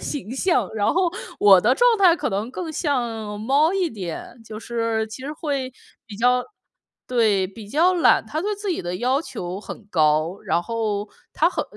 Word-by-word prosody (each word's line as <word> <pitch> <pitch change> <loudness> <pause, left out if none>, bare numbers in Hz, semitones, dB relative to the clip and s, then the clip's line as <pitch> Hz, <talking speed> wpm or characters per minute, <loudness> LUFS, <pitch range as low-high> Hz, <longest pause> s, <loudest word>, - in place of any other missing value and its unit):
形 275 -8 -5
象， 345 +6 +1
然 205 -2 +1
后 360 0 +2 0.3
我 195 -3 +7
的 240 +7 +3
状 485 - +4
态 365 -4 +6
可 - - -2
能 205 +3 -2
更 325 +3 -5
像 235 -9 -2
猫 280 +9 +3
一 370 -4 0
点， 195 - -7
就 215 -1 -8
是 230 -1 -1
其 220 +4 -9
实 285 +3 -5
会 280 -4 -3 0.3
比 210 -3 -9
较 250 +3 +2 0.6
对， 220 -6 +2
比 200 +2 -12
较 335 - +3
懒。 350 - +4
他 310 - -4
对 415 +4 -1
自 410 0 -4
己 345 - -1
的 175 +1 -4
要 255 +6 +1
求 185 - -6
很 215 - -9
高， 155 +2 +2
然 170 - +1
后， 215 -1 -2 0.3
他 335 +3 +3
很 - - -2
235 Hz, 200 characters per minute, -22 LUFS, 205-310 Hz, 0.6 s, 我